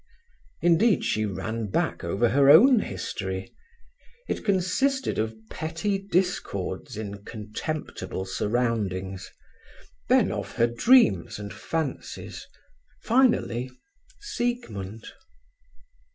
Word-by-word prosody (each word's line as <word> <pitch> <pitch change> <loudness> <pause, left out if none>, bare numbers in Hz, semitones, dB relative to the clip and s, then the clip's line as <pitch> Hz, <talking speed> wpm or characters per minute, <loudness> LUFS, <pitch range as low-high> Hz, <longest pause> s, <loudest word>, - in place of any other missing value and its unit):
Instead, 175 +5 +4
she 110 0 0
ran 110 +3 -3
back 95 - -1
over 100 +8 +1
her 135 +3 +4
own 235 - +8
history: 95 - -4 0.7
it - - -3
consisted 205 - +1
of 110 0 -2
petty 165 +5 -2
discords 165 - -2
in 100 -2 -6
contemptible 105 -3 -5
surroundings, 95 -3 -2 0.8
then - - +4
of - - -4
her 115 - +3
dreams 120 - +4
and 100 -1 -7
fancies, 160 -4 -5 0.6
finally—Siegmund. 235 - -1
120 Hz, 85 wpm, -26 LUFS, -, 0.8 s, own